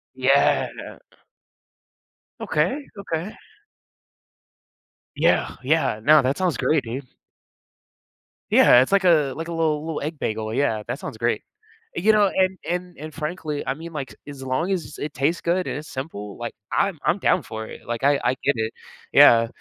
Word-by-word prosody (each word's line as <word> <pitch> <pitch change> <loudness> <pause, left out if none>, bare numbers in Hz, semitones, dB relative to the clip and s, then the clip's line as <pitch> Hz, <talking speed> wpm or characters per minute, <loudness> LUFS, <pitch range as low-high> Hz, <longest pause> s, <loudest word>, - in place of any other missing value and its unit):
Yeah. 130 +2 +3 1.7
Okay. 175 - 0 0.2
Okay. 175 +1 -4 1.8
Yeah. - - +2
Yeah. 150 -5 +1
Now, 150 +3 +7
that 130 +2 0
sounds 185 -4 0
great, 155 -4 +1
dude. 130 +3 -6 1.4
Yeah, 120 - +7
it's 130 - 0
like 200 -1 +3
a, 155 -7 +4
like 165 +1 -5
a - - -6
little 155 -2 0
little 160 -2 -4
egg 155 +1 -5
bagel, 110 0 -3
yeah, 115 -5 0
that 125 +4 -4
sounds 110 - -7
great. 120 +1 -1 0.5
You 215 +5 +4
know, 210 -1 +4
and 190 0 +1
and 180 0 -3
and 155 +1 -8
frankly, 155 -2 -4
I - - 0
mean, 165 +4 -9
like, 135 -7 -5
as 140 -2 -8
long 130 +8 -1
as 180 -4 -4
it 150 -1 -4
tastes 145 +6 0
good 180 +2 0
and - - -3
it's 155 - -10
simple, 105 -7 -6
like, 120 -1 -5 0.2
I'm 195 -6 0
I'm 180 - +2
down 185 - +2
for 110 -4 -7
it. - - -12
Like, 120 +1 -4
I 140 0 +4
I 125 - +2
get 140 - +3
it. 110 0 -2 0.4
Yeah. 115 0 +7
150 Hz, 165 wpm, -23 LUFS, 130-170 Hz, 1.8 s, Now